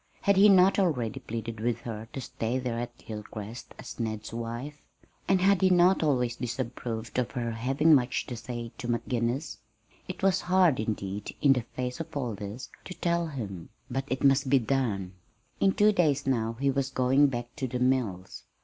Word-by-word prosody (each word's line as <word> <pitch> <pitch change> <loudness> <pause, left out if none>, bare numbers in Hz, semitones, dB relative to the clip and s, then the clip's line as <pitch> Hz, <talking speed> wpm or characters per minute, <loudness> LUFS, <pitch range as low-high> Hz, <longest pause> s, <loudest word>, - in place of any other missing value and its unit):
Had 200 - +3
he 200 +2 +7
not 190 0 +6
already 125 - 0
pleaded 115 0 -5
with 115 +1 -1
her 110 -1 -6
to 135 - -5
stay 115 0 -2
there 125 -2 -2
at 120 0 -7
Hilcrest 110 +1 -8
as - - -9
Ned's 110 -1 -4
wife? 120 +6 -5 0.5
And 190 -1 +3
had 195 0 +4
he 190 - +5
not 180 +1 +5
always 125 -6 +1
disapproved 120 -1 -4
of 125 - 0
her 120 -3 -2
having 135 +8 +3
much 130 -2 +2
to 125 - -6
say 120 0 -6
to 125 - -5
McGinnis? 120 +3 -1 0.5
It - - -7
was 195 -1 +3
hard, 180 -6 +3
indeed, 105 -2 -3
in 140 -2 +5
the 125 - -1
face 125 0 -3
of 160 -2 -5
all 125 -5 -2
this, 105 +5 -7 0.2
to 185 - -7
tell 170 -1 0
him. 105 - -6 0.2
But 135 +2 -2
it 130 - -3
must 135 0 +4
be 135 - +6
done. 115 -7 -1 0.5
In 195 - +4
two 210 +1 +5
days 150 -8 +2
now 115 -4 0
he 140 0 +2
was 135 0 -1
going 135 +2 +4
back 120 -2 -5
to 135 -3 -2
the 125 - -3
mills. 125 -8 -1
125 Hz, 185 wpm, -28 LUFS, 115-145 Hz, 0.5 s, he